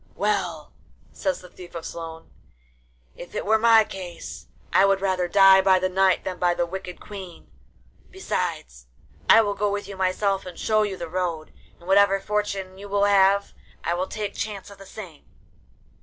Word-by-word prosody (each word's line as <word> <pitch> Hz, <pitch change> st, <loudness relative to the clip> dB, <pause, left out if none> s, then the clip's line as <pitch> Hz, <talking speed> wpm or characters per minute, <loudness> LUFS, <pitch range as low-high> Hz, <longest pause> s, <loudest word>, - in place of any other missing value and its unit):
'Well,' 190 Hz, -7 st, -2 dB, 0.4 s
says 285 Hz, -, -2 dB
the 180 Hz, -, -13 dB
Thief 180 Hz, -2 st, -13 dB
of 165 Hz, -, -6 dB
Sloan, 165 Hz, -1 st, -8 dB, 0.8 s
'if 175 Hz, -, -11 dB
it -, -, -3 dB
were 220 Hz, +2 st, +3 dB
my 225 Hz, -1 st, +6 dB
case 185 Hz, -4 st, -9 dB, 0.3 s
I 190 Hz, -, +6 dB
would 195 Hz, -1 st, +3 dB
rather 185 Hz, -2 st, 0 dB
die 195 Hz, +1 st, +7 dB
by 190 Hz, -1 st, +4 dB
the 185 Hz, 0 st, 0 dB
Knight 190 Hz, 0 st, +2 dB
than 185 Hz, -1 st, -5 dB
by 175 Hz, -1 st, +2 dB
the 175 Hz, -, 0 dB
wicked 180 Hz, 0 st, -7 dB
Queen; 185 Hz, -, -10 dB, 0.6 s
besides, -, -, -4 dB, 0.4 s
I 225 Hz, -, +9 dB
will 205 Hz, -2 st, -1 dB
go 205 Hz, +1 st, 0 dB
with 205 Hz, 0 st, -3 dB
you 200 Hz, -, -8 dB
myself 190 Hz, +1 st, 0 dB
and 180 Hz, -, -9 dB
show 215 Hz, -1 st, +2 dB
you 205 Hz, -3 st, -2 dB
the 170 Hz, -, -5 dB
road, 170 Hz, -2 st, -3 dB, 0.2 s
and 170 Hz, -, -17 dB
whatever 195 Hz, 0 st, +4 dB
fortune 195 Hz, -2 st, -3 dB
you 205 Hz, 0 st, -9 dB
will 200 Hz, 0 st, +1 dB
have, 200 Hz, 0 st, +3 dB, 0.3 s
I 170 Hz, -, 0 dB
will 180 Hz, +2 st, -2 dB
take 210 Hz, -2 st, -4 dB
chance 205 Hz, -2 st, -5 dB
of 200 Hz, -, -14 dB
the 195 Hz, -, -12 dB
same. 180 Hz, -9 st, -10 dB
190 Hz, 180 wpm, -24 LUFS, 180-200 Hz, 0.8 s, I